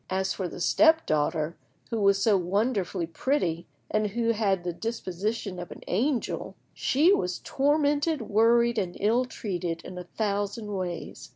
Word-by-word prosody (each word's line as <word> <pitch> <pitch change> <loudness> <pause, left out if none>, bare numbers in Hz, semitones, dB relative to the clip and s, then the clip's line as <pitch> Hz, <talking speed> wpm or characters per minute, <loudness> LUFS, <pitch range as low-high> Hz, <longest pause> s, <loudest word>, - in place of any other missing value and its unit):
As 190 0 0
for 190 - -3
the 175 - -8
step 320 - +4
daughter, 155 +1 0 0.4
who 225 -2 -1
was 200 0 +4
so 215 -3 +5
wonderfully 195 -1 0
pretty, 170 - -1 0.2
and 215 0 +2
who 230 +3 0
had 200 -5 +1
the 175 -1 -2
disposition 210 -1 -3
of 175 - -7
an - - -9
angel, 260 +1 -1 0.2
she 315 +9 +3
was 180 - 0
tormented, 290 +2 +1
worried, 230 +2 +3
and 180 -3 -3
ill 230 +5 +2
treated 175 -8 -4
in 180 - -8
a 180 - -7
thousand 205 +2 -2
ways. 175 -3 -5
205 Hz, 155 wpm, -27 LUFS, 180-235 Hz, 0.4 s, so